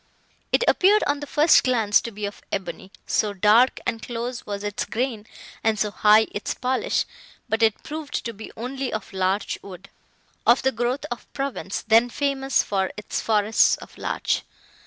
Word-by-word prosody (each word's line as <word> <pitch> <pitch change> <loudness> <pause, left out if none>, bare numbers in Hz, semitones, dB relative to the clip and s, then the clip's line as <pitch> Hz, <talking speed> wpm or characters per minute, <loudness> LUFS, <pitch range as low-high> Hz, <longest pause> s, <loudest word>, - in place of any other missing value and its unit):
It - - +3
appeared, 410 +3 +5
on 285 0 0
the 290 - -7
first 300 +3 +5
glance, 225 -5 +3
to - - -5
be 210 0 -5
of 200 - -7
ebony, 190 0 -5
so 210 -1 0
dark 215 +6 +4
and 225 - -2
close 240 +1 -5
was 200 0 -4
its 205 -1 -2
grain 225 -1 -3 0.4
and 220 -1 +2
so 210 0 0
high 215 +2 +5
its 205 - -3
polish; 255 +1 0 0.4
but 225 0 -1
it 220 -2 +2
proved 305 -1 -5
to 230 - -3
be 220 +1 -10
only 260 +3 -4
of 215 -2 -5
larch 190 +2 -1
wood, 190 -1 -12 0.5
of 240 +2 +4
the 265 - +3
growth 245 +4 -2
of 240 - -7
Provence, 270 -8 -3
then 225 +2 +4
famous 270 -1 0
for 190 -2 -1
its 210 - -3
forests 215 0 +3
of - - -13
larch. - - -1
225 Hz, 175 wpm, -24 LUFS, 210-260 Hz, 0.5 s, appeared